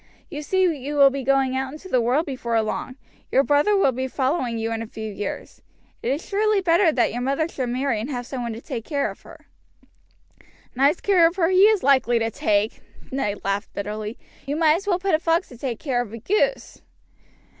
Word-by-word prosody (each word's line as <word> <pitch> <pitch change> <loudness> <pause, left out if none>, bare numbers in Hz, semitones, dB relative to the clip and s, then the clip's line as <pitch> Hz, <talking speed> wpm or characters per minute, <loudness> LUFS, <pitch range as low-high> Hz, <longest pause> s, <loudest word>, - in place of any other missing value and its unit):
You 295 - -5
see 375 +5 +1
you 295 -5 -1
will 280 -1 +6
be 275 0 -4
going 270 0 +2
out 265 +1 -2
into 310 +5 -10
the 255 -9 +2
world 255 +8 +1
before 235 -5 -1
long. 255 +4 -4 0.4
Your 270 - +4
brother 295 +9 +3
will 330 -9 +3
be 260 +1 -3
following 260 -2 -1
you 225 0 -2
in 225 0 -2
a 225 - -5
few 220 -1 -7
years. 205 0 -6 0.4
It 245 - -1
is 285 +5 -3
surely 420 +1 +2
better 345 -1 +3
that 255 -5 +1
your 245 - -3
mother 275 +5 0
should 260 -6 -4
marry 255 -1 0
again 215 +3 -3
and 285 - -4
have 245 0 -4
some 255 0 -5
one 235 -1 -3
to 225 - -8
take 250 -6 -5
care 285 0 -1
of - - -15
her." - - -15 1.3
"Nice 280 +6 +2
care 365 -5 +5
of 335 - -4
her 345 -3 +2
he 375 +1 +6
is 435 -3 +2
likely 260 -3 +3
to 225 0 -1
take!" 210 +1 0 0.3
Ned 210 -6 -2
laughed 200 +1 -2
bitterly. 210 +2 -5 0.3
"You 285 - -1
might 315 0 +4
as 390 +3 -9
well 365 -3 +2
put 380 0 -1
a 310 - +4
fox 330 +2 0
to 245 - -12
take 250 -4 -3
care 255 -4 -1
of 230 -4 -7
a - - -5
goose." 425 - -1
270 Hz, 225 wpm, -23 LUFS, 235-330 Hz, 1.3 s, will